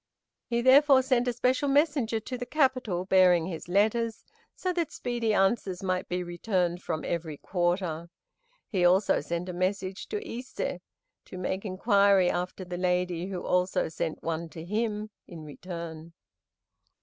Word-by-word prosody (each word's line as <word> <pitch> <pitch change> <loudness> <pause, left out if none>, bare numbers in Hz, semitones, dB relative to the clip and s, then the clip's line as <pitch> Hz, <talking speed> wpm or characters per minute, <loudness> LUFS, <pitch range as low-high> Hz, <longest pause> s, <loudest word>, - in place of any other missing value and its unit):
He, 235 0 0
therefore, 270 +1 +6
sent 255 -2 +1
a 245 - +1
special 255 +4 +1
messenger 275 -6 +2
to 250 +4 -6
the 245 0 -5
capital 255 - +1
bearing 180 -3 +5
his 170 -2 -6
letters, 220 +4 +1 0.3
so 365 -1 -2
that 340 -4 -1
speedy 235 -2 -2
answers 195 -2 +1
might 185 -1 -1
be 180 0 -1
returned 175 0 -1
from 160 -4 -3
every 160 -3 -3
quarter. 175 -2 -1 0.6
He 190 -6 0
also 185 +3 +4
sent 170 +4 -4
a 180 - -4
messenger 185 +1 -2
to 425 0 -4
Ise 250 +2 -7 0.7
to 185 - -9
make 190 +2 -3
inquiry 200 -1 +3
after 180 +1 -4
the 175 0 -5
lady, 180 -1 0
who 185 -2 -5
also 180 -1 +1
sent 160 0 -4
one 165 0 -3
to 160 0 -9
him 215 +1 -2 0.2
in 165 -3 -9
return. 165 +1 -8
185 Hz, 150 wpm, -28 LUFS, 175-235 Hz, 0.7 s, therefore